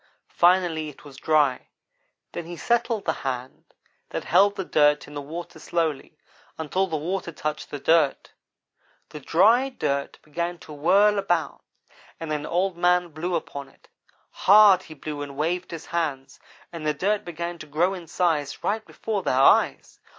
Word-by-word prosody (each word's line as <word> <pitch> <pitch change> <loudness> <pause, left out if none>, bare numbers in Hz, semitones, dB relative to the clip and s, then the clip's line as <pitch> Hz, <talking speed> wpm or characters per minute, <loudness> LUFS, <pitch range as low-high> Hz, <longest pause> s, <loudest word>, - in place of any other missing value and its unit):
Finally 175 -3 +3
it 150 - -15
was 140 -2 -12
dry; 145 -2 +1 0.6
then 170 - -6
he 175 0 -7
settled 235 -1 0
the 160 - +1
hand 130 -1 -5 0.4
that - - -4
held 200 +1 +4
the 190 -2 -4
dirt 150 -2 +3
in 145 - -12
the 145 - -5
water 165 +5 -8
slowly, 160 -5 -2 0.4
until 180 +5 -1
the 160 -3 -2
water 170 +3 -3
touched 150 -1 -4
the 145 - -5
dirt. 160 -1 +2 0.8
The 150 - -8
dry 220 - +3
dirt 140 - -3
began 170 +3 -4
to 155 - -11
whirl 200 +8 +3
about 175 -5 -1 0.6
and 165 -2 -5
then 150 -1 -2
Old 180 +2 0
man 175 0 +2
blew 170 +3 -3
upon 140 -4 -5
it. - - -26 0.4
Hard 200 -2 +6
he 160 -4 -12
blew 150 0 -6
and 140 -1 -7
waved 175 +4 -1
his 165 -1 -7
hands, 145 -6 -3 0.3
and 165 -2 -7
the 150 -1 0
dirt 205 +6 0
began 170 0 -5
to 155 - -9
grow 165 +6 +1
in 175 -3 -8
size 155 -5 -1
right 215 +2 -1
before 215 -1 -4
their 130 - 0
eyes. 135 - +3
165 Hz, 165 wpm, -24 LUFS, 150-185 Hz, 0.8 s, Hard